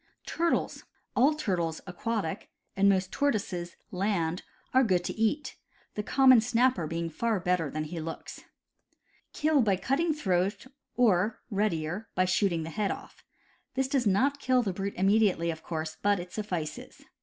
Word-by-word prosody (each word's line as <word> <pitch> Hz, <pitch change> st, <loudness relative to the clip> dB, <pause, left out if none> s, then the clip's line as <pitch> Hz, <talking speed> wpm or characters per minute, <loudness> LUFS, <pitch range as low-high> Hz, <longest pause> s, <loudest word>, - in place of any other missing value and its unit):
Turtles. 340 Hz, 0 st, -1 dB, 0.2 s
— -, -, -46 dB
All 280 Hz, +5 st, +4 dB
turtles 175 Hz, -, -1 dB
(aquatic) 195 Hz, 0 st, -3 dB, 0.3 s
and 200 Hz, +1 st, +4 dB
most 185 Hz, -1 st, +1 dB
tortoises 200 Hz, -11 st, -1 dB, 0.2 s
(land) 180 Hz, -3 st, -1 dB, 0.3 s
are 260 Hz, +1 st, +6 dB
good 185 Hz, -6 st, +2 dB
to -, -, -3 dB
eat, 225 Hz, +7 st, -1 dB, 0.4 s
the 210 Hz, -, -2 dB
common 260 Hz, +2 st, +6 dB
snapper 245 Hz, -6 st, +2 dB
being 165 Hz, +1 st, -2 dB
far 215 Hz, +6 st, -1 dB
better 180 Hz, -4 st, 0 dB
than 155 Hz, +2 st, -3 dB
he 165 Hz, +2 st, -6 dB
looks. 160 Hz, +1 st, -7 dB, 0.9 s
Kill 305 Hz, -2 st, +2 dB
by 205 Hz, -4 st, +3 dB
cutting 275 Hz, -, 0 dB
throat 195 Hz, -, 0 dB, 0.3 s
or 215 Hz, -3 st, +2 dB
(readier) 195 Hz, 0 st, -1 dB
by 185 Hz, -, +3 dB
shooting 180 Hz, -2 st, +1 dB
the 160 Hz, -, -6 dB
head 210 Hz, +1 st, -1 dB
off. -, -, -7 dB, 0.5 s
This 265 Hz, 0 st, +1 dB
does 265 Hz, -4 st, +1 dB
not 270 Hz, +9 st, +2 dB
kill 255 Hz, -2 st, +2 dB
the 195 Hz, -4 st, -2 dB
brute 195 Hz, +2 st, -4 dB
immediately, 195 Hz, -3 st, +3 dB
of 160 Hz, -1 st, -8 dB
course, 160 Hz, -1 st, -4 dB
but 205 Hz, -1 st, +2 dB
it 180 Hz, 0 st, -8 dB
suflSces. 180 Hz, -7 st, -5 dB
195 Hz, 155 wpm, -29 LUFS, 175-235 Hz, 0.9 s, are